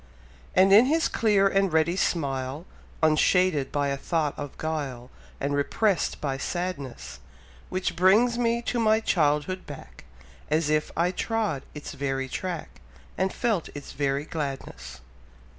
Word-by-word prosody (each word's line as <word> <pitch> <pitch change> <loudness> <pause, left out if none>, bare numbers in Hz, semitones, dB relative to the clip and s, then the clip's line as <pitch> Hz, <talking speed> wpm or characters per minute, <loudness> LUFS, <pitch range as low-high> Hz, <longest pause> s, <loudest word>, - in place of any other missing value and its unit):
And 190 +1 +6
in 220 +5 +8
his 320 +4 +2
clear 205 -3 +3
and 195 -1 +2
ready 160 +2 +2
smile, 140 -4 -1 0.4
Unshaded 155 -1 +3
by 145 -1 0
a 140 - -1
thought 155 0 -1
of 145 -2 -7
guile 140 -6 -4 0.3
And 140 - -1
unrepress'd 170 +7 0
by 135 -2 -2
sadness, 140 - -4 0.5
Which 185 -1 -2
brings 205 +7 +4
me 235 0 0
to 240 - -1
my 220 -1 +4
childhood 160 -2 0
back, - - -11 0.4
As 155 0 +1
if 155 0 +1
I 175 +2 +2
trod 210 - -1
its 150 - -7
very 135 -1 -2
track, 175 +3 -5 0.3
And 190 +1 0
felt 220 -8 -1
its 145 - -8
very 140 0 -1
gladness. 135 - -6
160 Hz, 140 wpm, -26 LUFS, 140-195 Hz, 0.5 s, in